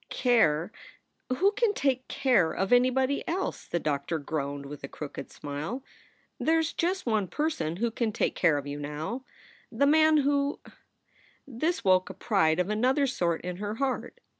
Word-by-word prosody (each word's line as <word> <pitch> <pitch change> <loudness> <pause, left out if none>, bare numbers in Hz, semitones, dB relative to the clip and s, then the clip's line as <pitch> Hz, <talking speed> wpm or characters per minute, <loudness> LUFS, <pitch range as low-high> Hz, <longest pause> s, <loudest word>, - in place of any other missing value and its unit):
"Care! 195 - +2 0.6
Who 365 +11 +3
can 445 -2 +1
take 260 -2 0
care 200 - +2
of 195 +4 0
anybody 260 +2 +3
else?" 370 +3 -3
the 170 - -1
doctor 150 +1 -1
groaned, 140 -2 -4
with 145 0 -9
a - - -4
crooked 145 +1 -7
smile. 150 - -5 0.6
"There 325 +1 +3
s 325 0 0
just 365 +3 -1
one 215 -5 +1
person 175 - -2
who 230 +5 -1
can 230 -1 -1
take - - 0
care 165 -5 +3
of 145 - -4
you 145 0 -5
now: 155 - -5 0.5
the 255 +4 +2
man 310 +1 +5
who 285 0 +1 0.4
" - - -33 0.2
This 310 +7 -1
woke 185 -1 +3
a - - -8
pride 180 -7 +2
of 180 +3 0
another 255 +6 +2
sort 175 -10 0
in 180 0 -5
her 205 +2 -4
heart. 270 - -2
225 Hz, 170 wpm, -28 LUFS, -, 0.6 s, man